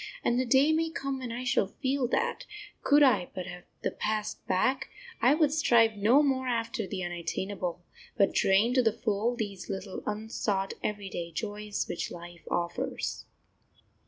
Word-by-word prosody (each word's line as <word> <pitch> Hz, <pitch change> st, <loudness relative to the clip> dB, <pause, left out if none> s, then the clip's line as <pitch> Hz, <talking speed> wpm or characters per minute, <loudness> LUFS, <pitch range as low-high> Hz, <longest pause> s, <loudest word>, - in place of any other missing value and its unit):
And 240 Hz, +1 st, +2 dB
the 255 Hz, -, 0 dB
day 275 Hz, +4 st, +5 dB
may 325 Hz, +1 st, +1 dB
come 275 Hz, -4 st, -3 dB
when 250 Hz, -2 st, -5 dB
I 240 Hz, +2 st, -4 dB
shall 245 Hz, -5 st, +2 dB
feel 260 Hz, +4 st, -1 dB
that, 465 Hz, -, -1 dB, 0.3 s
could 290 Hz, +1 st, +5 dB
I 255 Hz, -10 st, +4 dB
but 185 Hz, -1 st, -4 dB
have 180 Hz, -1 st, -9 dB, 0.2 s
the -, -, 0 dB
past 215 Hz, 0 st, -2 dB
back, 255 Hz, +9 st, +1 dB, 0.3 s
I 265 Hz, +4 st, +5 dB
would 305 Hz, -2 st, +3 dB
strive 235 Hz, -8 st, +4 dB
no 230 Hz, +8 st, +5 dB
more 260 Hz, -2 st, +1 dB
after 230 Hz, -2 st, -1 dB
the 185 Hz, -2 st, -4 dB
unattainable, 175 Hz, +1 st, -3 dB, 0.3 s
but 200 Hz, -, +4 dB
drain 200 Hz, +5 st, +4 dB
to 255 Hz, -, +5 dB
the 225 Hz, -3 st, +2 dB
full 220 Hz, +2 st, 0 dB
these 205 Hz, -5 st, -5 dB
little, 195 Hz, -1 st, -5 dB
unsought, 210 Hz, -2 st, -1 dB
everyday 195 Hz, -5 st, -3 dB
joys 210 Hz, +2 st, -3 dB
which -, -, -3 dB
life 175 Hz, 0 st, -10 dB
offers. 245 Hz, +10 st, -2 dB
220 Hz, 160 wpm, -29 LUFS, 195-260 Hz, 0.3 s, day